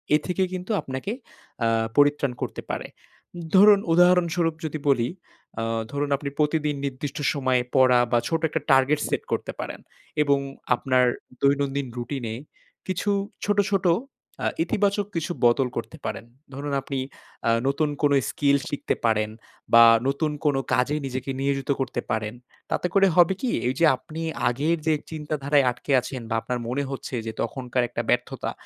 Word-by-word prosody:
এ -, -, +6 dB
থেকে 185 Hz, +1 st, +1 dB
কিন্তু 185 Hz, +4 st, -4 dB
আপনাকে 130 Hz, +10 st, -5 dB, 0.5 s
আ -, -, +3 dB, 0.3 s
পরিত্রাণ 145 Hz, -2 st, +4 dB
করতে -, -, -4 dB
পারে। -, -, -4 dB, 0.7 s
ধরুন 205 Hz, +1 st, +8 dB
উদাহরণস্বরূপ 175 Hz, -2 st, +3 dB
যদি 155 Hz, 0 st, -3 dB
বলি, 120 Hz, -3 st, +3 dB, 0.5 s
আ -, -, -1 dB, 0.3 s
ধরুন 145 Hz, 0 st, -2 dB
আপনি 140 Hz, +1 st, -4 dB
প্রতিদিন 150 Hz, -1 st, +1 dB
নির্দিষ্ট 140 Hz, +1 st, -4 dB, 0.2 s
সময় 130 Hz, -3 st, +1 dB
পড়া 130 Hz, -2 st, +6 dB
বা 120 Hz, -, +4 dB
ছোট 165 Hz, -, 0 dB
একটা 160 Hz, -, -2 dB
টার্গেট 135 Hz, +3 st, +4 dB
সেট -, -, -1 dB
করতে -, -, -1 dB
পারেন, -, -, -5 dB, 0.4 s
এবং 140 Hz, -1 st, +3 dB, 0.4 s
আপনার 130 Hz, -2 st, +2 dB, 0.4 s
দৈনন্দিন 140 Hz, -1 st, +1 dB
রুটিনে 120 Hz, -2 st, -4 dB, 0.5 s
কিছু 185 Hz, +2 st, -1 dB, 0.4 s
ছোট, 205 Hz, 0 st, +1 dB
ছোট 195 Hz, -1 st, +1 dB, 0.6 s
আ -, -, +3 dB, 0.2 s
ইতিবাচক 200 Hz, +3 st, +1 dB
কিছু 165 Hz, +1 st, -2 dB
বদল 125 Hz, +2 st, +4 dB
করতে -, -, -5 dB
পারেন। -, -, -4 dB, 0.3 s
ধরুন 140 Hz, +1 st, -4 dB
আপনি 135 Hz, -1 st, -4 dB, 0.5 s
আ -, -, +4 dB, 0.2 s
নতুন 145 Hz, +2 st, +1 dB
কোনো 145 Hz, -1 st, +4 dB
স্কিল 140 Hz, -1 st, +2 dB
শিখতে 145 Hz, -, -2 dB
পারেন, 110 Hz, -1 st, +2 dB, 0.4 s
বা 115 Hz, 0 st, +10 dB, 0.2 s
নতুন 150 Hz, +2 st, 0 dB
কোনো 140 Hz, -2 st, +3 dB
কাজে 125 Hz, +4 st, +2 dB
নিজেকে 130 Hz, +1 st, -4 dB
নিয়োজিত 135 Hz, 0 st, -1 dB
করতে 125 Hz, -2 st, -2 dB
পারেন। 110 Hz, 0 st, -1 dB, 0.4 s
তাতে 180 Hz, -, 0 dB
করে 195 Hz, -1 st, +5 dB
হবে 175 Hz, +1 st, +6 dB
কি 255 Hz, -, 0 dB, 0.2 s
এই 125 Hz, -, +1 dB
যে 165 Hz, -, +5 dB
আপনি 160 Hz, +4 st, -8 dB, 0.3 s
আগের 150 Hz, +7 st, 0 dB
যে 160 Hz, -, +4 dB, 0.2 s
চিন্তাধারায় 150 Hz, -2 st, +1 dB
আটকে 125 Hz, -, -7 dB
আছেন 130 Hz, 0 st, -6 dB
বা 115 Hz, -, 0 dB
আপনার 125 Hz, +1 st, -3 dB
মনে 135 Hz, +4 st, -1 dB
হচ্ছে 135 Hz, -1 st, -5 dB
যে 110 Hz, -, -3 dB
তখনকার 125 Hz, +1 st, -1 dB
একটা -, -, -2 dB
ব্যর্থতা -, -, 0 dB
140 Hz, 155 wpm, -25 LUFS, 130-160 Hz, 0.7 s, বা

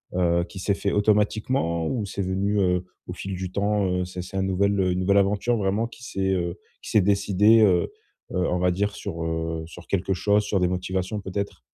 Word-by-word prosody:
heu, 85 Hz, -1 st, +2 dB
qui 95 Hz, -, -13 dB
s'est 100 Hz, +2 st, +1 dB
fait 100 Hz, 0 st, -1 dB
automatiquement 105 Hz, -4 st, +1 dB
ou 115 Hz, -5 st, -1 dB
c'est 100 Hz, -, -4 dB
venu, 100 Hz, +2 st, 0 dB
heu, 90 Hz, -1 st, +1 dB, 0.2 s
au 90 Hz, -, -5 dB
fil 95 Hz, 0 st, -5 dB
du 90 Hz, 0 st, -5 dB
temps? 100 Hz, 0 st, +1 dB
Heu, 90 Hz, 0 st, 0 dB
c'est 90 Hz, 0 st, -6 dB
c'est 95 Hz, -, -7 dB
un 95 Hz, -, +1 dB
nouvel 100 Hz, +1 st, +1 dB
une 90 Hz, -1 st, +1 dB
nouvelle 100 Hz, +2 st, +3 dB
aventure 105 Hz, +4 st, +2 dB
vraiment 100 Hz, +3 st, 0 dB
qui 120 Hz, +1 st, -14 dB
s'est, 95 Hz, -3 st, -1 dB
heu, 85 Hz, 0 st, -2 dB, 0.2 s
qui -, -, -9 dB
s'est 110 Hz, -, +4 dB
décidée, 100 Hz, +3 st, +4 dB
heu, 90 Hz, -4 st, +3 dB, 0.4 s
heu, 90 Hz, -2 st, 0 dB
on 90 Hz, -, 0 dB
va 90 Hz, 0 st, +2 dB
dire 100 Hz, +2 st, -1 dB
sur, 80 Hz, 0 st, -5 dB
heu, 80 Hz, 0 st, -2 dB
sur 85 Hz, +1 st, -12 dB
quelque 95 Hz, 0 st, 0 dB
chose, 105 Hz, +3 st, +2 dB
sur 100 Hz, -1 st, 0 dB
des 90 Hz, -, +3 dB
motivations 95 Hz, +2 st, -2 dB
peut-être? 100 Hz, +1 st, -4 dB
95 Hz, 215 wpm, -25 LUFS, 90-100 Hz, 0.4 s, s'est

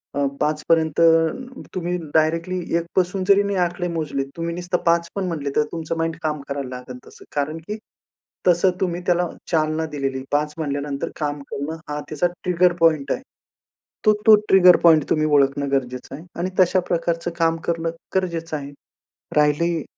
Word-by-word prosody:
अ, 140 Hz, 0 st, +1 dB, 0.2 s
5 150 Hz, 0 st, 0 dB
पर्यंत, 160 Hz, -2 st, +2 dB, 0.8 s
तुम्ही 180 Hz, -1 st, -1 dB, 0.2 s
डायरेक्टली 165 Hz, +3 st, +1 dB, 0.2 s
1 170 Hz, -, -2 dB
पासून 185 Hz, +1 st, +1 dB
जरी 200 Hz, 0 st, +6 dB
नाही 200 Hz, -1 st, -1 dB
आकडे 175 Hz, 0 st, 0 dB
मोजले, 155 Hz, -4 st, -2 dB
तुम्ही 170 Hz, 0 st, -2 dB
नुसतं 180 Hz, 0 st, -1 dB
5 170 Hz, 0 st, +3 dB
पण 195 Hz, -2 st, -1 dB
म्हटले 150 Hz, -5 st, -3 dB
तर 150 Hz, -, +4 dB
तुमचं 165 Hz, 0 st, -4 dB
माइंड 165 Hz, 0 st, -1 dB
काम 150 Hz, -2 st, -1 dB
करायला 140 Hz, -2 st, -3 dB
लागेल 125 Hz, 0 st, -8 dB
तसं. -, -, -15 dB
कारण 145 Hz, +2 st, -1 dB
की 210 Hz, -, -4 dB, 0.7 s
तसं 180 Hz, +2 st, +4 dB
तुम्ही 180 Hz, -2 st, -1 dB
त्याला 175 Hz, 0 st, +2 dB, 0.2 s
चालना 155 Hz, -1 st, +1 dB
दिलेली, 135 Hz, -2 st, -2 dB
5 150 Hz, +1 st, 0 dB
म्हटल्यानंतर 145 Hz, -2 st, -3 dB
काम 145 Hz, -1 st, -2 dB
करणं 145 Hz, +3 st, -3 dB
हा 150 Hz, 0 st, -3 dB
त्याचा 155 Hz, +3 st, +1 dB, 0.2 s
ट्रिगर 180 Hz, 0 st, +3 dB
पॉइंट 155 Hz, -4 st, +3 dB
आहे. -, -, -1 dB, 0.8 s
तो, 215 Hz, -, +6 dB
तो 220 Hz, -, +10 dB
ट्रिगर 185 Hz, -2 st, +7 dB
पॉइंट 160 Hz, -3 st, +6 dB
तुम्ही 155 Hz, 0 st, +2 dB
ओळखणं 140 Hz, -1 st, +2 dB
गरजेचं 125 Hz, -1 st, -2 dB
आहे. 155 Hz, -, -12 dB, 0.2 s
आणि 185 Hz, +2 st, -1 dB
तशा 185 Hz, +1 st, +4 dB
प्रकारचं 170 Hz, 0 st, 0 dB
काम 165 Hz, -1 st, +2 dB
करणं 165 Hz, -1 st, 0 dB, 0.3 s
गरजेचं 165 Hz, -4 st, -1 dB
आहे. 140 Hz, -1 st, -7 dB, 0.7 s
राहिली, 150 Hz, +2 st, +2 dB
165 Hz, 165 wpm, -22 LUFS, 145-175 Hz, 0.8 s, तो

